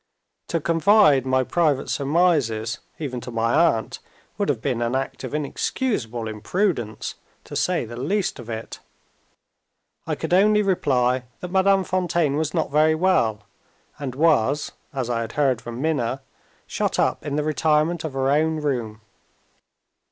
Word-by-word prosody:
To 165 - -1
confide 165 - +4
my 130 0 +2
private 150 -1 +1
surmises, 140 -8 +1 0.2
even 130 -6 -4
to - - -8
my 115 0 0
aunt, 150 -10 +2 0.4
would - - -1
have - - +1
been 120 -2 -2
an 120 +2 0
act 135 +1 -3
of 130 +3 -4
inexcusable 140 - -2
imprudence, 110 - -2 0.3
to - - -9
say - - 0
the 120 - -9
least 190 +10 -1
of 120 -1 -9
it. 110 0 -6 1.3
I - - 0
could - - -3
only 210 +3 +5
reply 130 -9 +1 0.2
that 180 - -6
Madame 195 0 +3
Fontaine 170 -5 0
was 155 0 -1
not - - -1
very 155 +2 +4
well, 140 - +1 0.6
and 135 -4 -5
was 145 -2 +2 0.2
(as 130 -4 -3
I 120 -1 -1
had 115 - -5
heard 135 -5 +1
from 120 0 -7
Minna) 135 -4 -1 0.4
shut - - -2
up - - +1
in 145 - -3
the 150 - 0
retirement 155 +2 +1
of 155 -4 -4
her 135 0 +1
own 160 +2 +2
room. 120 -8 -3
145 Hz, 150 wpm, -23 LUFS, 120-165 Hz, 1.3 s, only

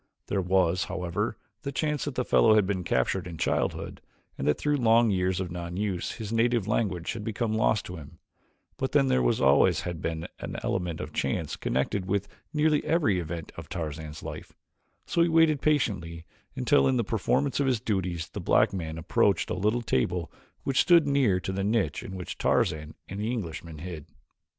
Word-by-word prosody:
There 100 - 0
was, 90 0 +2
however, 90 -2 -2 0.2
the 140 - -4
chance 150 +1 -1
that 145 -3 -4
the 125 - -1
fellow 110 -1 +5
had 105 -2 +4
been 95 -2 -1
captured 85 +7 0
in 85 -2 -7
childhood - - -1 0.3
and 70 - -3
that 75 - +3
through 150 0 +1
long 115 -2 +4
years 95 -1 +1
of 90 -2 -3
non 85 0 -5
use 100 -4 -2
his 110 -1 -6
native 115 -2 +2
language 95 -6 -1
had 110 - -6
become 110 +1 -2
lost 110 -1 +2
to 90 - -7
him, 75 -2 -12 0.6
but - - -2
then 70 - +4
there 65 0 +3
always - - +4
had 85 -2 -5
been 80 +1 -3
an - - -6
element 85 -3 -2
of - - -7
chance - - -1
connected 90 +8 -1
with 100 0 0 0.2
nearly 150 -1 +2
every 145 - +2
event 85 -1 -5
of - - -9
Tarzan's 80 -1 -5
life, - - -8 0.5
so 170 - +1
he 170 - +4
waited 160 -3 +4
patiently 95 - 0 0.3
until 135 +2 +3
in 130 -1 +2
the 120 - +2
performance 125 +7 0
of 140 - +2
his 125 -4 +2
duties 90 -7 -2
the - - -6
black - - +3
man 80 -4 -4
approached 80 - +1
a - - +1
little 105 +6 0
table 85 - 0 0.3
which 135 -2 +2
stood 170 -3 +5
near 130 -10 +3
the 95 +1 -3
niche 100 -7 0
in 95 - -7
which 90 -2 -6
Tarzan 75 0 +1
and 95 - -6
the 110 +2 -1
Englishman 85 -8 -5
hid. 80 -2 -7
95 Hz, 190 wpm, -27 LUFS, 85-120 Hz, 0.6 s, fellow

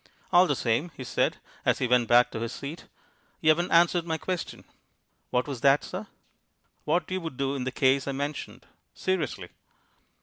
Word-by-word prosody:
"All 180 +1 +7
the 145 - +1
same," 120 +8 0
he 130 - -6
said, 125 - 0 0.3
as - - +2
he 130 - 0
went 125 -1 +3
back 120 +1 +5
to - - -4
his 115 0 -3
seat, 145 +4 -7 0.5
"you 155 - +2
haven't 170 +3 +3
answered 170 +1 +4
my 160 -1 -2
question." 180 0 -4 0.7
"What 125 +2 0
was 135 -5 -5
that, 140 +1 +4
sir?" - - -6 0.8
"What 175 +4 0
you 185 0 -1
would 160 -6 -6
do 135 0 -1
in 130 -3 -3
the 130 - -2
case 135 +1 +2
I - - 0
mentioned. 145 +2 -5 0.3
Seriously." 185 -8 -2
140 Hz, 180 wpm, -27 LUFS, 130-170 Hz, 0.8 s, All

